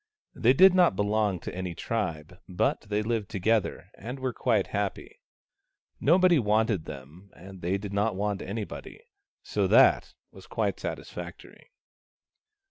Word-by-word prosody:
They 120 +2 +3
did 190 +6 +7
not 180 - +4
belong 105 -1 0
to - - -6
any 90 -1 -5
tribe, 80 +4 -4
but 90 - 0
they 105 0 0
lived 110 -2 -2
together, 110 +1 -1
and 125 +6 -7
were 130 -1 -2
quite 110 -7 +1
happy. 100 -1 -3 0.8
Nobody 175 +1 +4
wanted 105 -5 +1
them, 75 +9 -11
and 95 +1 -12
they 90 +3 0
did 100 0 -7
not 105 +1 0
want 100 0 -2
anybody. 105 - -7 0.4
So - - 0
that - - +4 0.2
was - - -15
quite - - -2
satis - - -6
factory. - - -10
105 Hz, 140 wpm, -27 LUFS, 95-115 Hz, 0.8 s, did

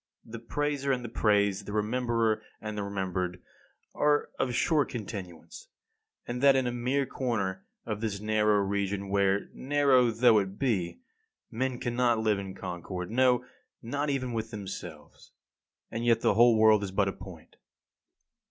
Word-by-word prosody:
The 115 +1 -8
praiser 140 +3 -1
and 125 -2 -1
the - - -5
praised, 100 -3 +1
the 105 - -5
rememberer 115 0 0 0.2
and 105 0 -6
the 105 - -3
remembered 95 -3 -3 0.5
are 145 0 +1
of 125 -2 0
short 155 +1 +2
continuance, 100 - -8 0.6
and 125 +1 -4
that 140 -1 +6
in 130 -1 +2
a 120 - 0
mere 125 +3 0
corner 100 -8 -3 0.2
of 110 -2 -4
this 105 -3 -2
narrow 105 -1 +2
region, 100 0 -2
where, 100 0 +1
narrow 135 -3 +3
though 115 -1 +5
it 95 0 -4
be, 110 - -1 0.5
men 130 +2 -2
cannot 120 -1 +1
live 110 -2 +1
in 95 -1 -7
concord, 90 0 -6
no, 125 0 +3 0.4
not 145 +5 -2
even 130 -3 -2
with 110 0 -3
themselves. 95 -7 -9 0.6
And 115 +1 -3
yet 120 -1 +3
the - - +3
whole 115 +1 +5
world 110 -1 +5
is 100 - -3
but 95 +1 +1
a 95 - -1
point. 90 -5 -13
110 Hz, 155 wpm, -29 LUFS, 100-125 Hz, 0.6 s, that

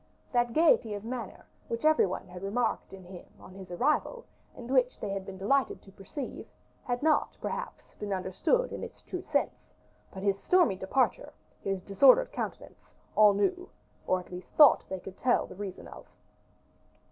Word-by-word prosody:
That 240 -1 +2
gayety 255 -9 +3
of 205 +1 -8
manner, 235 -4 -6 0.2
which 230 +4 -4
every 310 -8 +5
one 185 - -5
had 180 0 -10
remarked 220 +5 -1
in 195 -1 -11
him 180 0 -11
on 185 - -13
his 190 -1 -11
arrival, 305 - 0 0.3
and 240 - -9
which 255 -2 +2
they 205 - -4
had 195 0 -4
been 190 -1 -7
delighted 260 +8 +1
to 195 - -16
perceive, 200 +8 -7 0.4
had 245 0 -2
not 310 -1 +2
perhaps - - -6
been 205 -1 -4
understood 190 - 0
in - - -6
its - - -10
true - - -5
sense: - - -3 0.4
but 190 - -8
his 200 -1 +1
stormy 355 - +3
departure, 195 +8 0 0.3
his 195 -2 -2
disordered - - +5
countenance, - - -7 0.3
all 210 -1 +6
knew, 360 - 0 0.4
or 185 - +2
at 180 - -13
least 180 0 -8
thought 295 -2 +7
they 190 - -4
could 190 +1 -11
tell 250 -1 +2
the - - -11
reason 190 -1 -7
of. - - -12
205 Hz, 175 wpm, -29 LUFS, 190-265 Hz, 0.4 s, thought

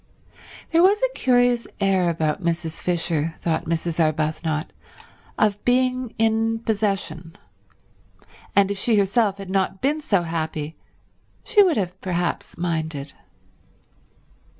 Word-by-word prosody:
There 330 0 +4
was 395 +3 +5
a - - +1
curious 245 - +2
air 190 -3 +2
about 160 +1 -1
Mrs. 165 -1 -2
Fisher, 165 -2 0
thought 165 -2 -1
Mrs. 165 0 -2
Arbuthnot, 155 0 0 0.7
of 205 -1 +1
being 255 -1 +1
in 225 0 +2
possession; 195 -7 -2 1.2
and 200 0 +4
if 200 - -4
she 225 +1 +2
herself 200 0 +2
had 195 -2 -8
not 190 0 0
been 295 +6 0
so 200 - +1
happy 160 -2 -3 0.7
she 415 - +4
would 360 - +3
have 185 -2 -3
perhaps 175 -3 -2
minded. 160 -4 -3
190 Hz, 120 wpm, -23 LUFS, 165-225 Hz, 1.2 s, was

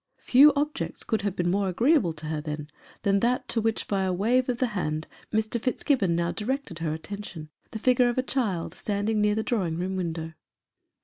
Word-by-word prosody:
Few 280 +4 +7
objects 295 +1 -2
could 220 -3 -1
have 200 -2 -2
been 175 0 +1
more 195 0 +1
agreeable 230 - +3
to 155 0 -8
her, 155 0 -2
then, 150 0 -5 0.3
than 200 0 +3
that 245 +4 +1
to 230 - +1
which, 225 0 -1
by 195 -1 0
a 190 -1 +1
wave 240 +8 +2
of 245 - 0
the 255 -1 +1
hand, 155 -5 -2 0.3
Mr. 220 +1 0
Fitzgibbon 245 - +1
now 170 0 0
directed 225 - -3
her 165 -2 -1
attention 175 -3 -8 0.2
the - - -5
figure 250 +2 +3
of 240 - -3
a 255 - +2
child 215 -11 -1
standing 210 +1 -1
near 210 0 +3
the 220 - 0
drawing 190 -10 -1
room 185 +2 -2
window. 165 -3 -3
205 Hz, 200 wpm, -27 LUFS, 170-240 Hz, 0.3 s, Few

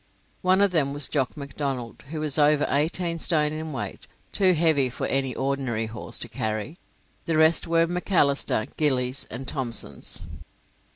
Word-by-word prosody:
One 185 +1 +4
of 200 -2 +4
them 145 -5 +1
was 145 -1 +2
Jock 140 0 -1
Macdonald, 140 -4 -5
who 155 0 -4
was 155 -1 +2
over 150 0 +4
eighteen 165 +4 0
stone 150 -2 +1
in 155 0 -5
weight, 135 - -6 0.2
too 190 -2 +4
heavy 155 -5 +3
for 125 - -4
any 135 -1 -1
ordinary 135 -4 -1
horse 110 0 -3
to - - -3
carry; 110 - -3 0.5
the 165 -2 0
rest 160 +2 +4
were 165 0 +3
Macalisters, 165 - +1
Gillies, 130 -3 0
and 135 - -6
Thomsons. 115 - -2
145 Hz, 155 wpm, -25 LUFS, 130-160 Hz, 0.5 s, One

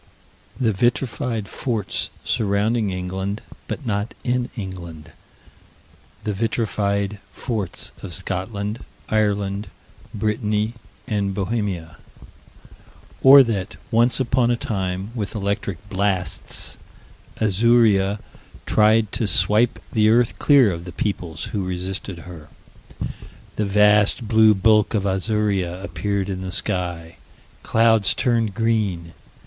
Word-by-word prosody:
The 115 -4 +2
vitrified 120 0 0
forts 110 -4 -2
surrounding 105 +1 +1
England, 95 +3 -3 0.2
but 145 - -5
not 105 -1 -2
in 125 0 0
England. 85 -6 -7 1.1
The 105 - -1
vitrified 100 -2 -1
forts 105 -5 -4
of 95 - -7
Scotland, 100 +4 -3 0.3
Ireland, 105 -2 0 0.4
Brittany, 105 +1 -1 0.3
and 100 -3 -1
Bohemia. 95 -5 -2 1.2
Or 135 +1 +10
that, 105 -4 -3 0.2
once 120 +3 +3
upon 125 -1 +2
a 120 - +3
time, 95 -2 -3
with 110 -4 -4
electric 100 -2 -3
blasts, 95 -3 -2 0.6
Azuria 105 -1 +3 0.5
tried 110 0 +3
to 110 - -1
swipe 105 +6 +2
this 110 -2 +3
earth 115 +2 +3
clear 135 -8 +5
of 85 0 -6
the 90 - -7
peoples 85 -6 -3
who 100 -3 -1
resisted 90 -1 -5
her. 80 -4 -11 1.1
The 105 - 0
vast 105 +2 +3
blue 110 -1 +6
bulk 105 +1 +3
of 100 -2 0
Azuria 95 -2 0
appeared 100 -1 -2
in 95 -2 -4
the 95 0 -4
sky. 90 -5 -3 0.4
Clouds 110 -3 +3
turned 115 -5 +1
green. 105 -8 0
105 Hz, 110 wpm, -22 LUFS, 95-110 Hz, 1.2 s, Or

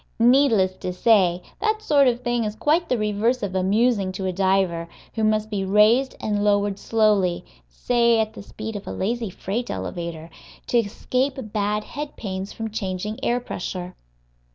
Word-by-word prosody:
Needless 230 -6 +4
to 180 - -4
say, 180 -3 +3 0.2
that 435 +1 +1
sort 285 -6 +4
of 245 0 +1
thing 240 -1 0
is 210 -1 -3
quite 315 +8 +1
the 250 - +2
reverse 215 +3 0
of 195 -2 -2
amusing 200 +2 +2
to 190 0 -4
a 185 - -1
diver, 190 -3 +1 0.3
who 220 - -2
must 215 0 +2
be 200 -2 -1
raised 215 +7 +4
and 205 -1 -1
lowered 205 -1 +1
slowly 210 -5 +2 0.2
(say 235 - +2
at 220 0 -1
the - - -9
speed 215 +2 -7
of 205 - -7
a - - -4
lazy 230 +2 -2
freight 205 +5 -4
elevator) 170 -2 -5 0.3
to 240 - +2
escape 255 +5 -1 0.2
bad 210 0 0
head 295 +4 -7
pains 190 -2 -5
from 225 -1 -5
changing 205 +1 -4
air 240 +1 +1
pressure. 180 -5 -5
210 Hz, 170 wpm, -23 LUFS, 190-235 Hz, 0.3 s, Needless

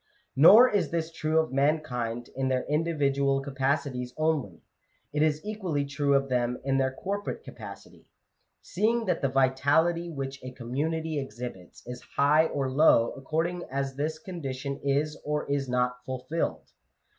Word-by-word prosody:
Nor 205 - +9
is 200 -9 0
this 165 -1 -2
true 155 0 -1
of 160 -4 +1
mankind 130 -5 -1
in 135 0 -1
their 130 -1 0
individual 140 -3 +1
capacities 135 -2 -2
only: 155 - -1 0.5
it 150 - 0
is 155 +2 +1
equally 185 -9 -2
true 140 0 +1
of 135 0 +2
them 125 -1 0
in 135 0 +1
their 130 0 +1
corporate 200 +9 -4
capacity; - - -11 0.6
seeing 225 +4 0
that 180 -4 0
the 135 - +1
vitality 145 +6 +2
which 135 -3 -6
a 130 0 -7
community 155 +6 -2
exhibits 120 -8 -8
is 125 0 -7
high 150 +3 +4
or 140 -3 -2
low 130 -5 +5
according 165 +6 -2
as 135 0 -2
this 155 +3 -2
condition 140 -6 -5
is 145 +2 0
or 150 0 -1
is 140 -2 -1
not 125 0 0
fulfilled. 130 +6 -3
140 Hz, 145 wpm, -28 LUFS, 130-160 Hz, 0.6 s, Nor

